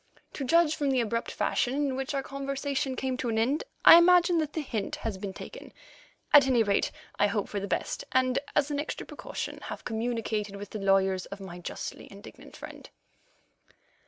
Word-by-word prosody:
To 280 - -4
judge 325 +3 +3
from 285 -2 -1
the 265 -1 +2
abrupt 230 0 -1
fashion 250 +2 0
in 285 -2 0
which 270 +2 -3
our 275 - -1
conversation 275 -1 -3
came 260 -1 -2
to 250 - -2
an 220 - -1
end, 260 +8 +1 0.2
I 335 - +11
imagine 350 0 +5
that 305 -2 -2
the 320 - -2
hint 225 -8 -3
has 215 -4 -5
been 200 -1 -4
taken. - - -10 0.6
At 285 -3 +8
any 245 -3 +4
rate, 200 -2 +1 0.3
I 205 - +5
hope 205 0 -1
for 205 - -3
the 200 - -4
best, - - -2
and, 255 0 +2 0.2
as 295 0 +2
an 285 - -1
extra 295 - -4
precaution, - - -6
have - - -7
communicated 220 -3 -2
with 200 0 -8
the 215 - -5
lawyers 195 -1 +2
of 200 - -8
my 185 -2 -8
justly 175 - -7
indignant - - -13
friend. - - -10
255 Hz, 190 wpm, -28 LUFS, 205-285 Hz, 0.6 s, I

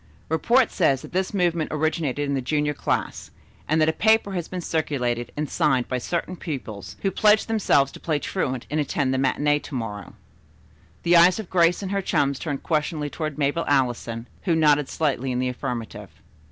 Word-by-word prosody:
"Report 235 - +3
says 135 -8 +2
that - - -10
this 185 +1 -1
movement 175 -5 0
originated 150 -2 -1
in 140 - -1
the 135 - 0
junior 150 +3 0
class, - - -2 0.4
and 155 +1 +2
that 155 - +4
a 160 - +2
paper 220 0 +3
has 175 -4 -3
been 185 - -5
circulated 125 -8 -2
and 150 0 -1
signed 130 -3 +1
by 130 - -2
certain 175 +7 -3
pupils, 110 - -6
who 195 - +1
pledged 215 +1 +4
themselves 190 -11 +2
to - - -11
play 155 -3 -1
truant 130 -6 -3
and 155 - 0
attend 140 -2 0
the 130 - 0
matinée 145 +2 +1
to - - -8
morrow." 105 -5 -5 0.9
The 170 0 +5
eyes 175 +2 +6
of 220 -5 -7
Grace 175 +1 +3
and 190 - -4
her 200 0 0
chums 140 -6 0
turned 145 -4 -4
questioningly 150 -2 -1
toward 155 -2 -4
Mabel 145 +3 0
Allison, 120 -4 0 0.2
who 170 -4 +2
nodded 150 -3 +3
slightly 135 -4 -1
in 125 - -1
the 125 0 0
affirmative. 120 -2 -5
150 Hz, 190 wpm, -24 LUFS, 130-170 Hz, 0.9 s, eyes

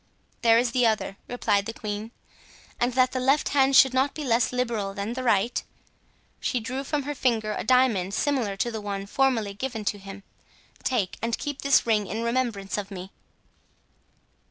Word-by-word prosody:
"There 230 -1 +5
is 240 0 +2
the 250 -1 +3
other," 215 -3 -1
replied 205 -5 0
the 225 - -5
queen; 210 +1 -5 0.7
"and 245 +1 +1
that 255 0 +3
the 260 - -2
left 270 +4 +2
hand 275 -1 +3
should 265 -1 +7
not 265 +2 +1
be 305 - -4
less 235 -3 +2
liberal 230 -6 -2
than 205 +3 -3
the 255 - -4
right," 235 -1 +1 0.8
she 250 - -1
drew 255 +4 -4
from 290 +1 -2
her 290 +2 -3
finger 225 -6 0
a - - -3
diamond 220 -6 +2
similar 245 -9 0
to 240 +4 -1
the 220 -1 -5
one 200 -1 -4
formerly 225 -3 +1
given 225 0 -4
to 205 - -1
him, 195 0 -10 0.6
"take 220 -8 -1
and 230 0 -1
keep 290 -2 -5
this 280 0 +4
ring 215 -3 +1
in 225 +4 -3
remembrance 235 -5 -1
of 200 -1 -6
me. 190 -1 -8
230 Hz, 180 wpm, -26 LUFS, 205-255 Hz, 0.8 s, should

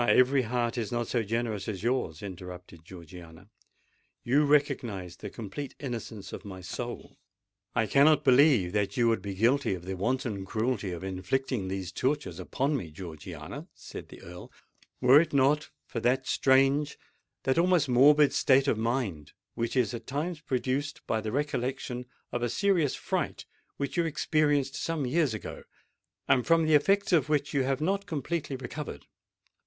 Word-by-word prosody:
every 130 +2 +5
heart 120 0 -1
is 110 -1 -3
not 120 -1 -1
so 120 - 0
generous 110 -2 -2
as 100 -3 -4
yours!" 120 - -1
interrupted 90 -3 -9
Georgiana. 85 +2 -12 0.7
"You 145 +5 +3
recognise 120 - 0
the - - -7
complete 120 +6 -7
innocence 115 -6 -6
of - - -7
my 95 -2 -8
soul——" 90 - -7 0.6
"I 115 - +3
cannot 145 +8 +5
believe 130 - +5
that 100 -1 -1
you 120 -1 +4
would 115 -4 +1
be 100 0 -5
guilty 120 +2 +2
of 90 -1 -10
the 95 0 -3
wanton 110 0 -1
cruelty 110 0 -1
of 85 +1 -6
inflicting 95 +4 -2
these 95 -2 -4
tortures 130 - -1
upon 135 +10 -1
me, 100 - -4
Georgiana," 80 -2 -8
said - - -9
the - - -13
Earl, 90 +1 -10 0.5
"were 135 +4 +8
it 165 - -4
not 140 +3 +3 0.2
for 115 - -4
that 130 +3 +1
strange—that 135 +1 +1
almost 175 -4 +3
morbid 140 +3 +6
state 135 +1 +4
of 110 - +1
mind 115 - -2 0.2
which 115 +2 -2
is 125 -5 +2
at 120 - -7
times 155 +4 -3
produced 135 0 -2
by 110 - 0
the 110 0 -4
recollection 130 -2 -2 0.2
of 120 - -2
a 120 - 0
serious 175 - +2
fright - - -3 0.3
which 140 +4 -3
you 170 - +3
experienced 150 -3 +1
some 155 -1 -2
years 140 -2 +1
ago, 105 - -7 0.7
and 125 -2 +3
from 165 -1 +4
the 155 - +2
effects 195 +7 +3
of 150 -4 +3
which 145 -1 0
you 140 - +2
have 135 +1 0
not 195 +4 0
completely 155 -2 -3
recovered. 130 - -7
125 Hz, 160 wpm, -29 LUFS, 100-145 Hz, 0.7 s, were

